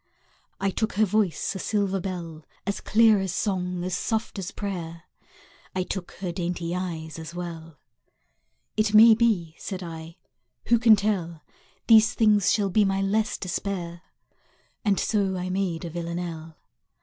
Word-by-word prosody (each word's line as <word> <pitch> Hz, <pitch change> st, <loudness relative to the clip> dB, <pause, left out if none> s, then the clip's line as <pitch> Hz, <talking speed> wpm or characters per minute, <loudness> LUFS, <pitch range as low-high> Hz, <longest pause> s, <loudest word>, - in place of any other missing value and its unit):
I 195 Hz, 0 st, 0 dB
took 220 Hz, +4 st, -2 dB
her 215 Hz, +2 st, +3 dB
voice, 205 Hz, -3 st, 0 dB
a 190 Hz, -, -6 dB
silver 200 Hz, -1 st, 0 dB
bell, 170 Hz, -4 st, -6 dB, 0.2 s
As 200 Hz, +1 st, -2 dB
clear 220 Hz, -1 st, +4 dB
as 190 Hz, -2 st, -2 dB
song, 180 Hz, -2 st, -2 dB
as 180 Hz, 0 st, -2 dB
soft 220 Hz, +1 st, -2 dB
as 185 Hz, -1 st, -4 dB
prayer; 175 Hz, -5 st, -5 dB, 0.7 s
I 185 Hz, -, 0 dB
took 185 Hz, -1 st, -5 dB
her 180 Hz, -2 st, -4 dB
dainty 175 Hz, -1 st, -3 dB
eyes 165 Hz, -3 st, -5 dB
as 160 Hz, +1 st, -8 dB
well. 165 Hz, -3 st, -7 dB, 1.0 s
It 215 Hz, 0 st, +1 dB
may 225 Hz, +1 st, +9 dB
be, 215 Hz, -8 st, +1 dB
said 190 Hz, -2 st, -5 dB
I, 165 Hz, 0 st, -8 dB, 0.5 s
who 235 Hz, -1 st, +5 dB
can 225 Hz, -2 st, +7 dB
tell, 185 Hz, -6 st, -2 dB, 0.4 s
These 220 Hz, -2 st, +6 dB
things 210 Hz, -3 st, +4 dB
shall 200 Hz, -3 st, +1 dB
be 210 Hz, +3 st, +4 dB
my 195 Hz, 0 st, +1 dB
less 215 Hz, +2 st, 0 dB
despair? 180 Hz, -2 st, -4 dB, 0.8 s
And 200 Hz, -3 st, +2 dB
so 195 Hz, -3 st, 0 dB
I 180 Hz, 0 st, -3 dB
made 185 Hz, -3 st, -2 dB
a 170 Hz, -, -6 dB
Villanelle! 170 Hz, -1 st, -5 dB
185 Hz, 150 wpm, -25 LUFS, 170-205 Hz, 1.0 s, may